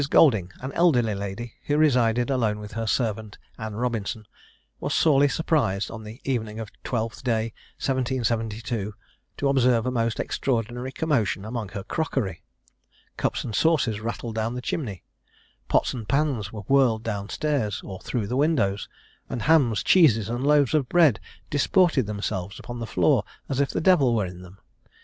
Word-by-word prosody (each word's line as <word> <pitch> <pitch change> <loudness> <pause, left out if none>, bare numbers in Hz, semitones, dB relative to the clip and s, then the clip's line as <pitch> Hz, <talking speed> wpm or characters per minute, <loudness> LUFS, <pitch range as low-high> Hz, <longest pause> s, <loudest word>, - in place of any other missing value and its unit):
Golding, 110 - +4
an 130 +2 -4
elderly 125 -11 +3
lady, 100 +4 -5
who 145 - +2
resided 125 -5 +3
alone 115 -5 +1
with 105 -1 -8
her 115 +1 -3
servant, 110 -2 -1 0.2
Anne 110 -1 -5
Robinson, 110 -2 -2 0.5
was - - -2
sorely 145 -3 +5
surprised 140 - 0
on 110 -1 -8
the 110 +3 -10
evening 110 -5 -2
of 110 -2 -5
Twelfth 115 -2 -3
day, 115 -2 0 0.2
1772, 115 -5 -1 0.4
to 140 - 0
observe 125 -4 +3
a 125 - 0
most 115 -2 -1
extraordinary 120 0 -2
commotion 115 - 0
among 110 -2 -4
her 100 0 -6
crockery. 125 - -2 0.7
Cups - - -1
and 110 - -5
saucers 130 -7 +2
rattled 115 0 -4
down 110 +2 -2
the - - -3
chimney 105 - -3 0.6
pots - - +2
and 115 -4 -7
pans 140 -8 0
were 105 - -6
whirled 120 -1 +3
down 100 -2 -3
stairs, 140 -10 -1
or 95 -1 -7
through 120 -5 -3
the 120 - -3
windows; 135 -9 +1 0.4
and 120 - -3
hams, 135 -10 +3
cheeses, 115 - +5
and 120 +2 -2
loaves 145 -2 +4
of 145 -5 +1
bread 160 -10 +5 0.3
disported 145 - +3
themselves 100 -2 -3
upon 120 -1 -7
the 115 - -4
floor 90 -5 +3 0.2
as 135 - -2
if 140 - +2
the - - -2
devil 150 -9 +4
were 105 -3 +1
in 90 0 -8
them. 90 +1 -13
115 Hz, 165 wpm, -25 LUFS, 105-135 Hz, 0.7 s, sorely